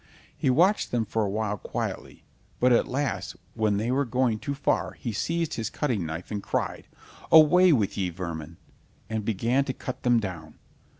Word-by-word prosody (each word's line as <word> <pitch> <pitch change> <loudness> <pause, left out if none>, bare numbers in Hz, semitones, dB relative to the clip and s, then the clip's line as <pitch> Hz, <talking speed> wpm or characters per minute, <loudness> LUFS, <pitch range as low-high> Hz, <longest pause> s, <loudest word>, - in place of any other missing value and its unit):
He - - 0
watched 180 +11 +3
them 120 -2 0
for 110 +2 -1
a 100 - -1
while 105 0 -1
quietly, - - -5 0.4
but 125 0 +4
at 120 - +3
last 140 +1 -2 0.2
when 110 -2 +1
they 110 +4 -1
were 135 +2 +2
going 125 -3 0
too 140 - -4
far, 140 - 0
he 120 - -5
seized 165 +9 -1
his 110 -2 -3
cutting 120 - -1
knife, 80 +5 -6
and 105 -1 -2
cried: - - -3 0.4
"Away 170 +3 +7
with 105 -8 +1
ye, 95 -2 0
vermin," 85 -2 -6 0.5
and 110 -1 -1
began 115 +6 +1
to 130 - -2
cut 130 - -6
them 120 -1 +3
down. 85 -7 -6
115 Hz, 180 wpm, -26 LUFS, 100-135 Hz, 0.5 s, Away